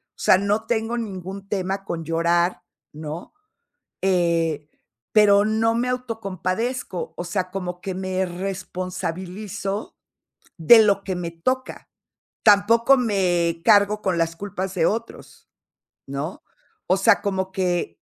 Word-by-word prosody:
o - - -28
sea, - - +5
no 205 +3 0
tengo 230 0 -1
ningún 195 -3 -6
tema 195 0 -2
con 165 -1 -4
llorar, 170 +2 +1 0.3
¿no?, 155 +2 -7 0.7
eh, 170 -5 +1 0.4
pero 205 -1 +6
no 220 +1 +1
me 245 +2 0
autocompadezco, 225 -3 -3
o - - -3
sea, 185 0 -2
como 180 -2 -5
que 190 - -4
me 185 0 -2
responsabilizo 185 +2 -5 0.6
de 220 +8 +8
lo 200 -2 +2
que 190 -2 -3
me 175 -1 -4
toca. 255 +11 -3 0.5
Tampoco 225 +5 +5
me 180 -8 +1
cargo 210 -1 +5
con 185 -2 0
las 165 0 0
culpas 190 0 -5
de 165 -3 +2
otros, 230 +2 -5 0.6
¿no?, 140 +6 -5 0.5
o 185 - +3
sea, 200 +2 +4
como 190 -2 -2
que 175 - -1
190 Hz, 125 wpm, -23 LUFS, 175-210 Hz, 0.7 s, de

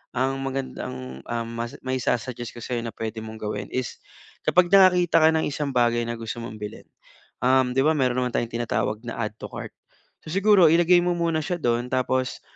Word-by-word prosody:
ang 130 +2 +1
magandang 70 - -5 0.6
mai-sususuggest 125 -2 -2
ko - - -8
sa'yo 120 -1 -2
na - - -5
pwede 110 0 -4
mong 110 0 -8
gawin 105 -1 -4
is 130 -1 -3 0.5
kapag 180 0 +4
nakakita 180 -3 +6
ka 160 - +7
ng 160 - +1
isang 145 0 -3
bagay 120 -1 +3
na 120 - -3
gusto 115 +1 -5
mong 110 -1 -7
bilhin, 105 0 -8 0.6
'di 130 0 +3
ba 160 - +4
meron 125 -3 +1
naman 125 - -2
tayong 115 - -1
tinatawag 115 -2 -1
na 115 - -5
"add 110 -1 -3
to - - -6
cart"? - - -7 0.5
So 155 - -7
siguro 195 -1 +5
ilagay 175 +2 +5
mo 180 - +1
muna 170 -2 0
siya 180 0 -1
doon, 120 +1 0
tapos, 130 0 0
125 Hz, 180 wpm, -24 LUFS, 115-160 Hz, 0.6 s, ka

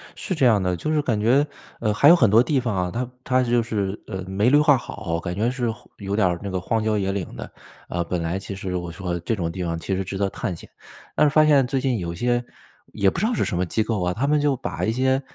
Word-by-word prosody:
是 185 - -3
这 140 -4 +2
样 110 -5 +4
的， 90 -1 0
就 155 - -3
是 155 - +2
感 115 -7 0
觉， 130 +7 +3 0.3
呃， 110 -2 0
还 140 +8 +6
有 170 - +9
很 120 - +4
多 110 +4 +6
地 135 +2 +1
方 120 -5 -2
啊， 90 -1 -1
它 125 +3 -3
它 130 0 +2
就 120 -1 +2
是， 105 -3 -2
呃， 95 -3 -5
没 100 +5 +2
绿 145 - +6
化 150 -2 +5
好， 95 -8 -4
感 85 +1 -4
觉 110 +5 +1
是 125 -1 -2 0.3
有 100 -1 -3
点 105 -3 +3
儿 85 -1 -1
那 100 - -3
个 95 -1 -2
荒 110 +3 -1
郊 110 -1 +1
野 95 -1 0
岭 95 -3 -4
的， - - -8 0.4
啊， 85 0 -2
本 85 0 -3
来 85 +3 -2
其 100 0 -7
实 95 -1 -4
我 85 -1 -4
说 90 0 -4
这 110 +7 -1
种 85 -5 -2
地 90 +1 -4
方 85 -1 -2
其 95 +3 -2
实 95 - -1
值 95 +1 -5
得 100 0 0
探 95 -3 -4
险。 - - -13 0.5
但 - - +4
是 - - +4
发 155 0 +6
现 145 -3 +5
最 135 +1 0
近 130 -3 0
有 85 -2 -4
些 120 +5 0 0.5
也 100 - +3
不 - - -4
知 205 - +1
道 240 - +1
是 - - 0
什 90 - -2
么 90 - +1
机 110 +6 0
构 110 -3 -2
啊， 90 0 0
他 125 +9 -1
们 150 +1 +3
就 145 -2 +2
把 130 - -4
一 110 - +1
些， 130 +3 +1
105 Hz, 310 characters per minute, -23 LUFS, 95-130 Hz, 0.5 s, 有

